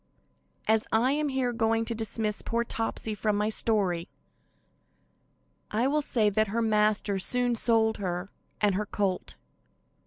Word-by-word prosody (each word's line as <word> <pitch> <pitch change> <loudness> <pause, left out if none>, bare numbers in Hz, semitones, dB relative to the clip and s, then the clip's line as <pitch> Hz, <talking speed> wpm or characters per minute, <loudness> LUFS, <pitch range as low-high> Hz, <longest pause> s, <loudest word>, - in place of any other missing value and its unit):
As 220 0 +2
I 235 +4 +3
am 295 +1 0
here 260 -2 0
going 225 0 +1
to 230 - -2
dismiss 220 -1 -2
poor 235 +1 -1
Topsy 225 -1 -3
from 210 0 0
my 210 +1 +1
story, 195 -6 +1 1.6
I 225 +4 0
will 300 +3 +2
say 230 -6 +1
that 215 +2 +2
her 225 +4 -1
master 210 -2 +2
soon 245 +4 +1
sold 225 -1 +2
her 180 -1 -3 0.3
and 205 -2 +3
her 210 +2 -2
colt. 195 -3 -2
220 Hz, 145 wpm, -28 LUFS, 210-230 Hz, 1.6 s, I